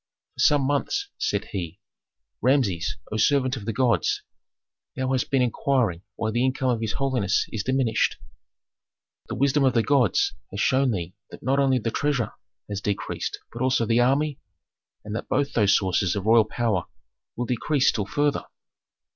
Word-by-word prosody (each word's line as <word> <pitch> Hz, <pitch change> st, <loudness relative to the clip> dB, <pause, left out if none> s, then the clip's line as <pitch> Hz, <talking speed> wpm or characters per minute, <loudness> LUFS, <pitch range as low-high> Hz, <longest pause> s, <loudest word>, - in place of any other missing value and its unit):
"For -, -, -19 dB
some 145 Hz, -2 st, +4 dB
months," 270 Hz, -, -1 dB
said 100 Hz, -, -1 dB
he, 90 Hz, -1 st, -5 dB, 0.6 s
"Rameses, 125 Hz, -11 st, +1 dB
O 110 Hz, -, -1 dB
servant 130 Hz, +2 st, +2 dB
of 110 Hz, -6 st, -7 dB
the 115 Hz, -, -1 dB
gods, 115 Hz, +1 st, +1 dB, 0.7 s
thou 130 Hz, 0 st, -1 dB
hast 130 Hz, -2 st, 0 dB
been 135 Hz, -2 st, +3 dB
inquiring 120 Hz, -7 st, 0 dB
why 110 Hz, -1 st, -2 dB
the 120 Hz, +2 st, +1 dB
income 130 Hz, 0 st, +1 dB
of 115 Hz, -2 st, -1 dB
his 110 Hz, -1 st, -1 dB
holiness 125 Hz, -8 st, +1 dB
is 110 Hz, -, -2 dB
diminished. 130 Hz, 0 st, +1 dB, 1.1 s
The -, -, -3 dB
wisdom 140 Hz, +1 st, +2 dB
of 130 Hz, -2 st, +3 dB
the 115 Hz, -, +4 dB
gods 145 Hz, -, +2 dB, 0.2 s
has -, -, -6 dB
shown 135 Hz, 0 st, +3 dB
thee 90 Hz, -5 st, -3 dB, 0.2 s
that -, -, -12 dB
not 135 Hz, +3 st, +2 dB
only 135 Hz, -2 st, +3 dB
the 115 Hz, -1 st, -2 dB
treasure 140 Hz, -6 st, 0 dB, 0.4 s
has 100 Hz, -1 st, -4 dB
decreased 100 Hz, -1 st, -3 dB
but 120 Hz, -, -6 dB
also 130 Hz, -2 st, +2 dB
the 115 Hz, +2 st, +2 dB
army, 140 Hz, +4 st, +2 dB, 0.7 s
and 105 Hz, 0 st, -5 dB
that -, -, -5 dB
both 140 Hz, +1 st, 0 dB
those 105 Hz, -3 st, +4 dB
sources 95 Hz, -1 st, 0 dB
of 100 Hz, -1 st, -3 dB
royal 110 Hz, 0 st, +5 dB
power 110 Hz, -6 st, -1 dB, 0.5 s
will 120 Hz, -, -2 dB
decrease 130 Hz, +3 st, +1 dB
still 105 Hz, -3 st, -1 dB
further. 145 Hz, +8 st, 0 dB
125 Hz, 170 wpm, -25 LUFS, 105-135 Hz, 1.1 s, royal